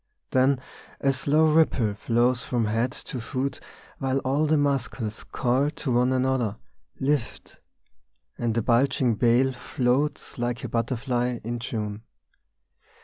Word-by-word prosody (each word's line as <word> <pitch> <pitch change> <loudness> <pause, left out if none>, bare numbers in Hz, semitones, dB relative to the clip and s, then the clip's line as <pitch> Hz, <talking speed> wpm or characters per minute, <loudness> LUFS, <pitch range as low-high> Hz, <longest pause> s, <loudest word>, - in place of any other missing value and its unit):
Then 130 +1 +3 0.4
a 135 -1 +2
slow 150 +3 +3
ripple 130 -9 +3
flows 120 +4 0
along 120 -2 +2
the 115 +4 -2
body, 135 +1 -1 0.4
While 135 0 0
all 140 +4 +2
the 155 +1 +3
muscles 130 -6 -1
call 130 +3 +1
to 150 -3 -4
one 125 +1 +3
another: 130 -5 +1 0.2
" 65 +1 -39
Lift! 145 -5 -2 0.4
" 65 0 -48
and 115 -2 0
the 115 - +1
bulging 125 +1 +3
bale 120 +4 +3
Floats 130 +2 -1
like 120 0 -2
a - - -4
butterfly 125 +1 -1
in 120 +2 -3
June. 105 -3 -4
125 Hz, 135 wpm, -26 LUFS, 115-135 Hz, 0.4 s, Then